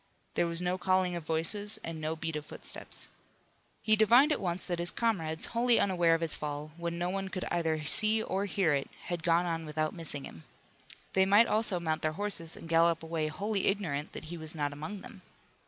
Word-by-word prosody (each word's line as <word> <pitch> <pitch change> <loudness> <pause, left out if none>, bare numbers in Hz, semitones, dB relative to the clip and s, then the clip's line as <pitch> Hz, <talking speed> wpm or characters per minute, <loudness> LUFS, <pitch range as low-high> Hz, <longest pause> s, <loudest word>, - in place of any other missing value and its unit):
There 170 - +1
was 170 +1 -3
no 180 +1 -1
calling 185 -1 +1
of 170 - -5
voices 205 +6 +3
and 165 -1 -5
no 155 +1 -2
beat 160 0 -4
of 150 - -3
footsteps. - - -2 0.8
He 215 - +4
divined 240 +7 +6
at - - 0
once 180 -1 -2
that 175 -2 -2
his 175 +1 +2
comrades, 165 -9 -1
wholly 235 0 +4
unaware 175 -4 +3
of 165 - -3
his 165 -2 +2
fall, 150 0 -5
when 170 0 -4
no 175 +1 -1
one 195 0 -3
could 185 -1 -4
either 160 -3 0
see 215 +7 +3
or 195 +2 -1
hear 185 -5 +1
it, 140 -1 -1
had 175 -2 -4
gone 170 +1 +2
on 165 -1 -2
without 155 0 -2
missing 155 -5 -5
him. 80 - -10 0.7
They 190 0 +4
might 205 +4 +6
also 215 -5 0
mount 160 -2 -1
their 155 0 0
horses 175 -3 +1
and - - -9
gallop 165 0 +3
away 160 -1 -2
wholly 200 +5 -1
ignorant 160 -8 -1
that - - -7
he 170 +2 -6
was 160 0 -2
not 145 -2 -1
among 155 +8 -6
them. 230 -6 -12
170 Hz, 210 wpm, -31 LUFS, 160-195 Hz, 0.8 s, divined